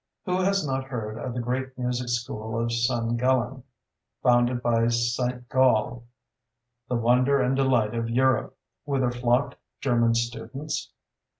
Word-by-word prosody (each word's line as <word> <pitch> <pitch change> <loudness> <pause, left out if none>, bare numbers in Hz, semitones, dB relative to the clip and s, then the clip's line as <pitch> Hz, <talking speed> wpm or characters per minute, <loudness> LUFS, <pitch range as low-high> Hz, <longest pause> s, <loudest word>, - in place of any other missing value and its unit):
Who 180 0 0
has 195 -2 +1
not 135 -1 -2
heard 115 -4 -5
of 125 0 -5
the - - -2
great 130 +2 -3
music 125 0 -2
school 115 -2 -3
of 115 0 -1
San 120 -1 0
Gallen, 130 +1 +1 0.6
founded 120 0 +3
by 115 -1 +2
St. 120 +1 -1
Gall, 120 -2 +2 0.8
"the 125 - 0
wonder 125 +4 +3
and 130 +1 +1
delight 125 -5 +2
of 115 0 -2
Europe," 130 0 +1 0.3
whither 135 -4 0
flocked 120 +2 0 0.2
German 115 -3 +2
students? 135 +5 -3
125 Hz, 135 wpm, -26 LUFS, 115-130 Hz, 0.8 s, founded